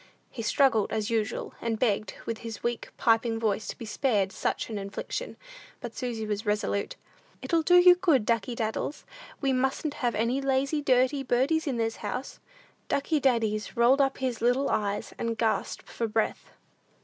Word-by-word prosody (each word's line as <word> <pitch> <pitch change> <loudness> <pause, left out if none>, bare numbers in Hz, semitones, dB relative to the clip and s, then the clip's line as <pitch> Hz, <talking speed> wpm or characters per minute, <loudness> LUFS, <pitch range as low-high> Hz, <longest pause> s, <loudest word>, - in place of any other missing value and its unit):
He 235 - -6
struggled 230 -2 +2
as 220 0 -1
usual, 220 -2 -1
and 230 -1 -1
begged, 215 -3 0
with 230 -1 -3
his 225 -2 -7
weak, 235 -1 -2
piping 225 0 +2
voice, 215 -1 -1
to - - -5
be 230 - -7
spared 215 -4 0
such - - -2
an 210 - -3
infliction. 200 - -5 0.4
But 240 -2 -7
Susy 235 -3 -3
was 210 0 -2
resolute. 210 -1 -1 0.5
"It'll 335 -2 +2
do 355 +3 +4
you 355 0 +9
good, 335 - +2
Ducky 230 +1 0
Daddles; 225 +5 -3 0.4
we 270 -2 +2
mustn't 265 +3 0
have 240 -2 +1
any 235 +5 0
lazy, 275 +2 +1
dirty 260 +1 +2
birdies 270 +6 +1
in 260 -4 -1
this 225 -1 -1
house." 260 - -5 0.5
Ducky 300 +2 +1
Daddies 225 -4 0
rolled 250 +4 +5
up 270 -1 +1
his 255 -4 -2
little 245 +4 +2
eyes, 205 -1 -1
and 230 -1 -2
gasped 225 -1 -1
for 230 - -3
breath. 220 0 -1
235 Hz, 170 wpm, -28 LUFS, 220-270 Hz, 0.5 s, you